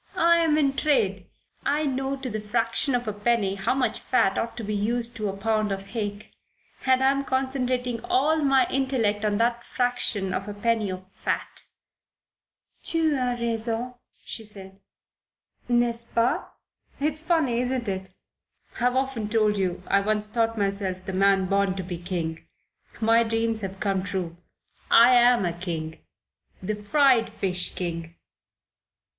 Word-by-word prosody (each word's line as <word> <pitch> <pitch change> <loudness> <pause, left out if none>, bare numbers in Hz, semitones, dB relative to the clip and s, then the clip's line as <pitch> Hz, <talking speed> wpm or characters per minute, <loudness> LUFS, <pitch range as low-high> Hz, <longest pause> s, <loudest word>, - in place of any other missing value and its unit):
I'm 335 -3 +4
in 280 -3 +2
trade. 200 -11 +1 0.4
I 300 +2 +1
know 270 0 -1
to 270 -1 -6
the 215 -3 -3
fraction 230 +5 0
of 245 -1 -2
a 215 - -1
penny 205 -1 +1
how 195 +5 -1
much 250 -4 0
fat 195 -6 +2
ought 230 +1 -3
to 235 - -5
be 210 0 -3
used 235 +3 0
to 210 -2 -2
a 195 - -5
pound 215 0 0
of 195 0 -5
hake, 205 -2 -5 0.6
and 260 0 +4
I'm 275 +1 +3
concentrating 255 -3 -1
all 300 +5 +2
my 270 -3 +4
intellect 245 -6 0
on 210 -1 +1
that 235 +1 +1
fraction 240 -6 -1
of 195 - -3
a 205 - -6
penny 220 -1 0
of 185 0 -6
fat." - - -4 1.2
"Tu 325 -2 0
as 250 -3 -1
raison," 230 +1 -2 0.3
she 225 - -4
said. 195 -2 -8 0.9
"N'est 240 -1 +3
ce 230 0 -2
pas? 235 +2 +1 0.5
It's 305 +2 -1
funny, 315 -8 +1
isn't 250 -1 -1
it? 190 -1 -3 0.7
I've 245 +1 +2
often 260 -5 -1
told 215 -1 +2
you 185 -2 -2
I 200 - +3
once 210 +1 0
thought 230 0 0
myself 195 -2 -1
the 190 - -4
man 195 0 +3
born 195 0 +1
to 190 - -4
be 175 -1 -6
king. 170 -3 -4 0.6
My 230 +1 +4
dreams 225 -1 0
have 195 -1 -6
come 195 -2 0
true. 185 -3 -4 0.5
I 240 +2 +7
am 240 -3 +5
a 170 - -1
king. 165 -2 -5 0.6
The 190 +3 -3
fried 235 +3 +3
fish 180 -2 -2
king." 170 -2 -4
225 Hz, 155 wpm, -25 LUFS, 195-250 Hz, 1.2 s, I